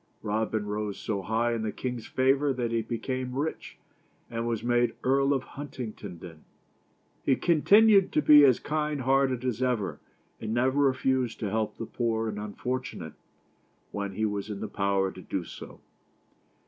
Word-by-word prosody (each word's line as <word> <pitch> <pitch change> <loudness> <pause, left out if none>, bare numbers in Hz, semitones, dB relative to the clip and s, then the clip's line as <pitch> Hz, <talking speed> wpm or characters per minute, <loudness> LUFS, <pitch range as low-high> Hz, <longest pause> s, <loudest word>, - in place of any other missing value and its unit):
Robin 110 0 -1
rose 105 -1 -3
so 100 -3 -3
high 115 +4 0
in 115 - -2
the 110 -1 -2
king's 125 -3 -5
favor 135 +2 +2
that 120 -3 -2
he 115 0 +1
became 125 +3 -4
rich, 150 +3 -4 0.5
and 115 0 -2
was 115 -2 -2
made 120 0 +2
Earl 135 +2 +3
of 135 -2 +1
Huntingdon. 105 - -8 0.8
He 135 - +3
con 165 0 +1
tinued 205 -1 +6
to 150 - +1
be 150 -1 +8
as 130 -4 +5
kind 150 -1 -2
hearted 130 -1 +2
as 125 -1 -1
ever, 105 -11 -1 0.4
and 110 +1 -3
never 130 +3 +2
refused 130 -3 +1
to 105 -3 -2
help 110 -1 -1
the 115 - -4
poor 115 -1 -1
and 105 -1 -4
unfortunate, 105 - -4 0.8
when 100 -1 -4
it 110 - 0
was 105 0 -3
in 105 -2 -5
his 105 -1 -5
power 100 -1 +1
to 95 - -11
do 95 0 -3
so. - - -11
120 Hz, 165 wpm, -28 LUFS, 105-130 Hz, 0.8 s, be